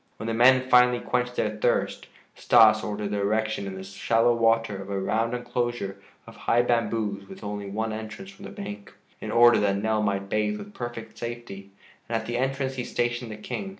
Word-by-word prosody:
When - - -7
the 115 - -1
men 130 +2 +5
finally 125 -1 +5
quenched 125 0 -1
their 105 -1 -1
thirst, 120 +3 0 0.3
Stas 110 -2 +5
ordered 105 -1 -3
the 105 - -1
erection 110 0 0
in 95 - -6
the 95 - -7
shallow 115 +4 +2
water 115 -2 +2
of 95 - -9
a 100 -1 -2
round 115 +5 0
enclosure 120 -5 -3 0.3
of - - -13
high 120 +1 +2
bamboos 110 -4 -1
with - - -11
only 105 -1 -5
one 110 +2 -2
entrance 110 - -7
from 195 0 -13
the - - -8
bank, 105 0 -8 0.2
in - - -6
order 120 0 +6
that 100 -1 +1
Nell 110 +1 0
might 100 -1 -1
bathe 105 0 0
with 205 - -10
perfect 120 - -7
safety. 115 -5 -7 0.4
And 115 - -1
at 110 - -5
the 120 +1 -2
entrance 135 +1 -1
he 125 - -2
stationed 120 0 -2
the 110 - -7
King. 195 - -5
115 Hz, 200 wpm, -26 LUFS, 105-120 Hz, 0.4 s, order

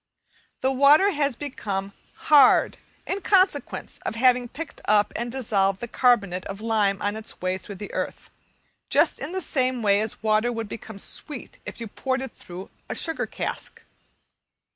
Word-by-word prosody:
The 265 0 +2
water 290 +9 +6
has 285 -6 0
become 200 -8 -4 0.2
"hard" 285 -4 +5 0.3
in 395 +2 -2
consequence 375 0 +1
of - - -4
having 250 +1 +3
picked 310 +5 -8
up 210 0 +3
and 235 +1 -3
dissolved 200 -7 +1
the 240 - -5
carbonate 200 -8 +2
of 195 0 -6
lime 215 -3 +1
on 205 +1 0
its 220 0 -7
way 185 +1 -1
through 200 - -9
the 205 +2 -8
earth, - - -4 0.6
just - - +3
in 310 - -5
the 375 +1 -2
same 255 -6 0
way 200 0 +4
as 220 0 -4
water 215 +2 +2
would 225 -2 -4
become 220 0 -8
sweet 265 +6 -4
if - - -7
you 230 - -4
poured 260 +5 -2
it 265 - -6
through 180 +2 -10 0.2
a - - -3
sugar 325 -1 -2
cask. - - -5
230 Hz, 165 wpm, -25 LUFS, 205-270 Hz, 0.6 s, water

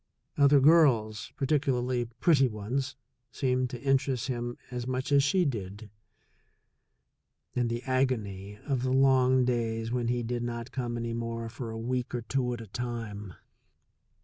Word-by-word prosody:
Other 140 0 +6
girls, 130 -8 +4
particularly 130 -3 +1
pretty 135 +4 +3
ones, 120 +5 -3 0.4
seemed 130 -1 0
to 120 -1 -7
interest 135 -2 +1
him 120 -1 -3
as 125 0 -4
much 130 +2 -2
as 140 -1 +6
she 175 +6 +2
did. 105 -5 -4 1.6
And 120 -1 +1
the 120 +1 -3
agony 110 -7 -1
of 135 -4 0
the 130 - 0
long 130 -1 +4
days 115 -2 -1
when 120 -1 -1
he 120 0 0
did 120 +1 -2
not 120 +1 -4
come 120 -3 -3
any 115 0 -3
more 115 0 -4
for 120 0 -6
a 115 - -5
week 125 +2 -2
or 120 - -3
two 125 +1 -1
at 120 -1 -4
a - - -8
time! 105 -4 -5
120 Hz, 150 wpm, -29 LUFS, 115-130 Hz, 1.6 s, Other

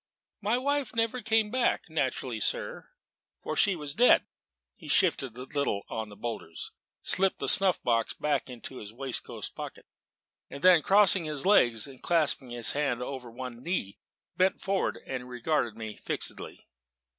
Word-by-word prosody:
"My 215 +4 +1
wife 280 -2 -1
never 230 +2 0
came 220 -1 +2
back: 255 -1 +1
naturally, - - -2
sir - - -3 0.5
for - - -3
she 200 -2 +3
was 150 -3 -5
dead." 245 +9 +5 0.5
He - - -14
shifted 135 - +2
a 125 - -6
little 135 -7 -1
on 110 -1 -4
the 105 - -12
boulders, 105 -8 -6 0.3
slipped 190 0 +4
the - - -4
snuff 195 -3 +5
box 115 -2 +1
back 150 -2 -1
into 125 +1 -8
his 105 -3 -8
waistcoat 130 +2 -5
pocket, - - -8 0.6
then 170 +4 +5
crossing 195 0 +4
his 150 -1 -3
legs 120 - +4
and 135 -2 -12
clasping 155 -6 +1
his 120 -1 +3
hands 140 -4 -1
over 125 -2 -6
one 120 0 -8
knee, 130 - -3 0.4
bent 185 +1 +2
forward 195 -1 -1
and 125 -1 -5
regarded 125 -2 -1
me 110 -1 -7
fixedly. - - -4
140 Hz, 155 wpm, -29 LUFS, 120-195 Hz, 0.6 s, dead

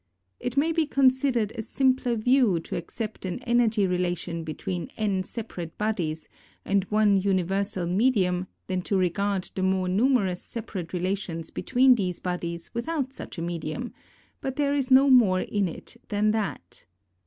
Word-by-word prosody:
It 245 +2 -4
may 310 +4 +3
be 325 -2 +1
considered 260 -5 +2
a - - -3
simpler 255 0 +1
view 230 -5 +3
to - - -6
accept 215 +5 -5
an 185 -2 -3
energy 235 -4 +3
relation 175 -2 -1
between 170 +3 -4
n 205 -4 0
separate 185 -5 -7
bodies 175 -8 -2 0.4
and 195 -1 +1
one 210 -1 +3
universal 190 0 0
medium 185 -2 +2 0.2
than 185 -1 -2
to 195 +2 0
regard 190 +1 0
the 190 - -3
more 190 0 +1
numerous 200 -2 +2
separate 200 -7 -6
relations 180 -2 -3
between 260 0 +4
these 185 -7 -1
bodies 170 -2 -4
without 270 +2 -2
such - - -9
a 165 - -3
medium, 170 +7 -4 0.5
but 265 -1 -3
there 285 -1 +1
is 275 -2 0
no 265 +1 +7
more 220 -9 +5
in 205 -2 0
it 165 - -8
than 210 0 +2
that. 205 - -4
200 Hz, 155 wpm, -26 LUFS, 180-245 Hz, 0.5 s, no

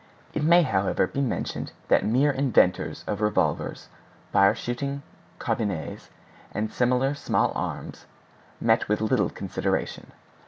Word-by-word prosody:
It 155 - -1
may, 170 +3 +6
however, 100 -8 +1
be 135 - -3
mentioned 130 -5 -3
that - - +4
mere 130 +7 +3
inventors 130 -9 +2
of 105 0 -3
revolvers, 105 0 0 0.5
fire 100 0 +5
shooting 140 +3 -4 0.3
carbines, 100 -8 -3 0.4
and 105 0 -3
similar 125 +2 +2
small 145 - +1
arms, - - -5 0.5
met - - +2
with 105 - +2
little 110 0 +1
consideration. - - -3
120 Hz, 120 wpm, -26 LUFS, 105-140 Hz, 0.5 s, may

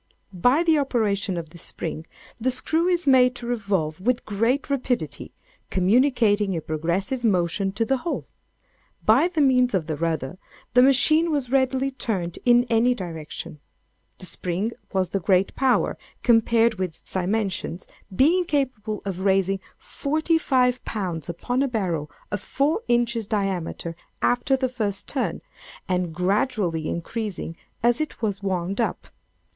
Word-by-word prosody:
By 245 - +3
the 325 -3 +4
operation 205 -8 0
of 165 -2 -5
this 170 -1 -12
spring, 160 0 -5 0.3
the 245 +3 0
screw 320 +7 0
is 355 -1 +1
made 255 -2 +5
to 240 - -8
revolve 195 -9 -1
with 245 +4 0
great 230 +7 0
rapidity, 255 -3 -2 0.4
communicating 210 -1 +3
a - - -3
progressive 170 - -2
motion 195 -2 +1
to 225 +3 0
the 270 +3 +1
whole. 330 +6 -3 0.8
By 345 - +5
means 255 -5 +4
of 175 -4 0
the 155 -1 -3
rudder, 165 +1 -2 0.3
the 250 - +7
machine 295 +5 +4
was 280 -6 -1
readily 265 0 +2
turned 190 -10 -3
in 240 0 +6
any 240 +1 +2
direction. 160 -5 -7 0.6
The - - -10
spring 185 +5 -3 0.2
was 190 -3 -1
of 195 - 0
great 185 +1 +2
power, 265 -2 +1 0.2
compared 230 -2 +3
with 185 -1 0
its - - -6
dimensions, 190 -2 -2 0.3
being 345 - +4
capable 255 -9 -2
of 190 -2 -3
raising 195 0 +2 0.2
forty 315 +3 0
five 250 -4 +2
pounds 180 -7 -4
upon 245 +10 -1
a 275 - +2
barrel 180 - -2 0.2
of 205 - -2
four 290 - 0
inches 235 -2 +1
diameter, 190 -5 -2 0.2
after 245 +2 +2
the 260 -1 0
first 215 -6 -3
turn, 270 - -2 0.4
and 180 -2 0
gradually 180 - 0
increasing 185 -1 -4 0.3
as 240 +3 +3
it 310 - -4
was 200 -3 -1
wound 190 +2 -1
up. - - -2
220 Hz, 145 wpm, -24 LUFS, 185-255 Hz, 0.8 s, the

